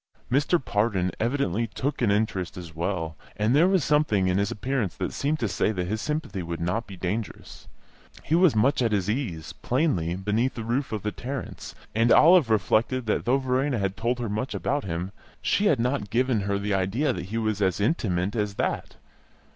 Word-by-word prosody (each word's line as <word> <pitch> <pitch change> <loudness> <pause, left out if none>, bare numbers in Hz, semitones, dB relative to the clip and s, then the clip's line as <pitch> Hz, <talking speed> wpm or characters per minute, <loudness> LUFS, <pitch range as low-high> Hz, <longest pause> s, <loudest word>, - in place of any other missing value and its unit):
Mr. 145 +6 +3
Pardon 105 -6 0
evidently 115 -3 0
took 135 +6 -3
an 120 - +3
interest 100 -3 0
as 85 -3 -8
well, 80 -1 -2 0.2
and 110 +5 +2
there 165 +5 +6
was 190 -4 +2
something 125 -10 +2
in 90 +1 +2
his 100 +1 +1
appearance 120 -4 -2
that - - -3
seemed 150 +3 0
to 115 - -1
say 105 - 0
that 90 -4 -2
his 110 +4 -2
sympathy 150 -10 -3
would 85 -1 -5
not 90 +8 -1
be 95 -2 -9
dangerous. 100 +5 -5 0.6
He 155 - -2
was 170 -5 +5
much 130 +6 +3
at 115 -3 +1
his 100 0 +1
ease, 100 - -4
plainly, 110 - 0
beneath 105 +7 0
the 115 - -4
roof 125 +5 -1
of 110 -3 -3
the 105 - -1
Tarrants, 130 +3 -6 0.2
and 115 +2 +3
Olive 165 -5 +7
reflected 115 +3 +1
that 110 - 0
though 125 +3 +3
Verena 130 0 0
had 100 -2 -1
told 120 +4 -1
her 120 -1 -3
much 110 +5 -3
about 145 +1 -1
him, 90 +1 -3 0.3
she 205 - +1
had 145 - +3
not 125 -3 -1
given 120 0 +1
her 100 0 -1
the 100 +1 -2
idea 95 +10 +1
that - - -5
he 105 +5 -4
was 110 -2 -1
as 95 -1 +1
intimate 100 - 0
as 105 -2 -1
that. - - -2
110 Hz, 200 wpm, -26 LUFS, 95-130 Hz, 0.6 s, Olive